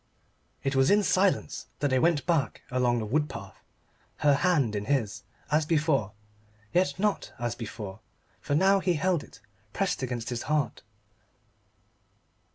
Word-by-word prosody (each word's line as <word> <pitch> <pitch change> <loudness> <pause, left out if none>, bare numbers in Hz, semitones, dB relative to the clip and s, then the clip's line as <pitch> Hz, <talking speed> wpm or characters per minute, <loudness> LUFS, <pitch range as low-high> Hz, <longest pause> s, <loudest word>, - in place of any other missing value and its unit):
It 135 0 0
was 135 +1 +4
in 205 +1 +5
silence 190 0 +1
that 145 -2 0
they 130 - +3
went 165 0 +2
back 160 -9 0
along 125 -1 +2
the 110 - -2
wood 150 +7 0
path - - -8 0.7
her 145 - +7
hand 140 - +2
in 105 0 -2
his, 110 -6 0 0.3
as 155 +1 +3
before. 150 - +1 0.6
Yet 180 +2 +2
not 205 +1 0
as 120 -1 -2
before, 110 -4 -7 0.4
for 145 - -1
now 195 +4 +4
he 185 -2 +1
held 170 0 +1
it 115 - -16 0.3
pressed 195 -6 -1
against 125 -2 -3
his 120 -1 -3
heart. 150 -7 0
145 Hz, 150 wpm, -28 LUFS, 120-170 Hz, 0.7 s, her